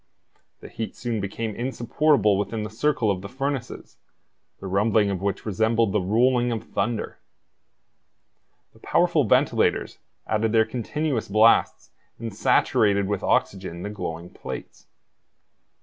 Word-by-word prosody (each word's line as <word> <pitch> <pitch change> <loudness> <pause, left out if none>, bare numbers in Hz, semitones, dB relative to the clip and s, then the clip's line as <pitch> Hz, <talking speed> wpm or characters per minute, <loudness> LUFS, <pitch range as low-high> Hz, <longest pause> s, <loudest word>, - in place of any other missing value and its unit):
The - - -9
heat 110 - -6
soon 115 -4 -3
became 105 +3 -4
insupportable 120 -2 +1
within 105 +2 -2
the 105 - -6
circle 120 -2 +1
of 100 +1 -5
furnaces, 135 -2 -5 0.6
the - - -9
rumbling 105 +2 +2
of 95 -2 -3
which 100 0 -2
resembled 110 +1 +1
the 105 - +1
rolling 120 +5 +2
of 115 -2 -3
thunder. 120 -3 -3 1.5
The - - -21
powerful - - +2
ventilators - - +1 0.3
added 110 +1 0
their 110 -1 +4
continuous 125 +3 -2
blasts 110 +3 +3 0.3
and 115 -2 -6
saturated 100 0 +2
with 100 -1 -2
oxygen 95 -3 -1
the 105 - -4
glowing 85 -4 -6
plates. - - -9
110 Hz, 125 wpm, -24 LUFS, 100-120 Hz, 1.5 s, their